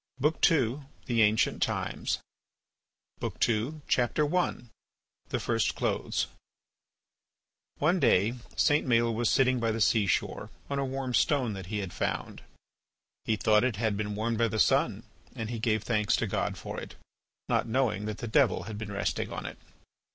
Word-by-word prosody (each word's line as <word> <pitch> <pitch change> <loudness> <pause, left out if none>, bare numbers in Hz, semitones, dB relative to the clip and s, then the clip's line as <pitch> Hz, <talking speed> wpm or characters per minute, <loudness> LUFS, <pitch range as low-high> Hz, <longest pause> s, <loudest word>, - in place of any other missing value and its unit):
BOOK 150 +4 +1
II. 135 -4 +1 0.3
THE 115 -2 +2
ANCIENT 110 0 +3
TIMES - - -1 1.0
I. - - -1
THE 120 +7 0 1.6
FIRST - - 0
CLOTHES - - -1 1.5
One 170 +5 +2
day 110 - +3 0.2
St. 150 -2 +3
Maël 115 -1 +3
was 115 0 +1
sitting 130 -1 +3
by 115 -1 0
the 110 +1 -1
seashore 105 -2 +1 0.2
on 140 - 0
a 140 - 0
warm 135 -1 -3
stone 130 -4 +2
that 95 -3 -7
he 105 0 -2
found. 90 - -3 0.8
He 110 - +2
thought 105 0 +3
it 125 -4 +1
had 110 0 0
been 105 0 -3
warmed 110 +1 -1
by 115 - +4
the 110 - -3
sun - - +2 0.3
and 110 0 -4
he 115 - -3
gave 110 -2 +1
thanks 105 -3 +1
to - - 0
God - - -2
for - - -6
it, - - -9 0.5
not - - +1
knowing 110 -4 0
that 110 0 -4
the 120 - -5
Devil 130 +2 +3
had 105 0 -7
been 105 -2 -5
resting 100 - -2
on - - -5
it. - - -7
115 Hz, 155 wpm, -29 LUFS, 105-130 Hz, 1.6 s, by